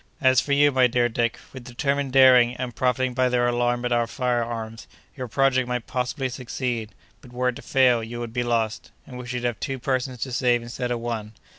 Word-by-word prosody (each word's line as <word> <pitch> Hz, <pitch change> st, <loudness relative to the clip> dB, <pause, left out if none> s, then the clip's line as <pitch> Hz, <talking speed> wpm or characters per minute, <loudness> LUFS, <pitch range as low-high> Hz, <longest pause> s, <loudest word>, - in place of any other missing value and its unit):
As 130 Hz, -1 st, +4 dB
for 145 Hz, -, -5 dB
you, 145 Hz, +1 st, +5 dB
my 130 Hz, -2 st, +4 dB
dear 120 Hz, 0 st, +1 dB
Dick, 115 Hz, 0 st, -1 dB, 0.2 s
with 130 Hz, -2 st, -9 dB
determined 140 Hz, +2 st, -2 dB
daring, 125 Hz, -2 st, +6 dB
and 125 Hz, -3 st, -5 dB
profiting 130 Hz, +1 st, 0 dB
by 130 Hz, 0 st, +2 dB
their 125 Hz, 0 st, +1 dB
alarm 120 Hz, 0 st, 0 dB
at 120 Hz, -, -1 dB
our 120 Hz, -1 st, +2 dB
fire 125 Hz, -1 st, -1 dB
arms, 115 Hz, -1 st, -6 dB, 0.3 s
your 130 Hz, -3 st, -5 dB
project 130 Hz, +1 st, +2 dB
might 125 Hz, -2 st, -3 dB
possibly 130 Hz, +1 st, -2 dB
succeed; 120 Hz, -4 st, -4 dB, 0.3 s
but, 125 Hz, -, -15 dB
were 125 Hz, +1 st, 0 dB
it 125 Hz, -, -4 dB
to -, -, -10 dB
fail, 125 Hz, -4 st, +3 dB
you 120 Hz, +2 st, -6 dB
would 120 Hz, -1 st, -6 dB
be 125 Hz, -, -1 dB
lost, 115 Hz, -2 st, -1 dB, 0.2 s
and 125 Hz, -2 st, -9 dB
we 125 Hz, -, -8 dB
should 125 Hz, 0 st, -4 dB
have 120 Hz, -4 st, -2 dB
two 135 Hz, -2 st, -3 dB
persons 130 Hz, 0 st, -2 dB
to 130 Hz, -, -3 dB
save 120 Hz, -1 st, +1 dB
instead 120 Hz, +1 st, -4 dB
of 120 Hz, -1 st, -1 dB
one. 115 Hz, -2 st, -5 dB
125 Hz, 225 wpm, -24 LUFS, 120-130 Hz, 0.3 s, daring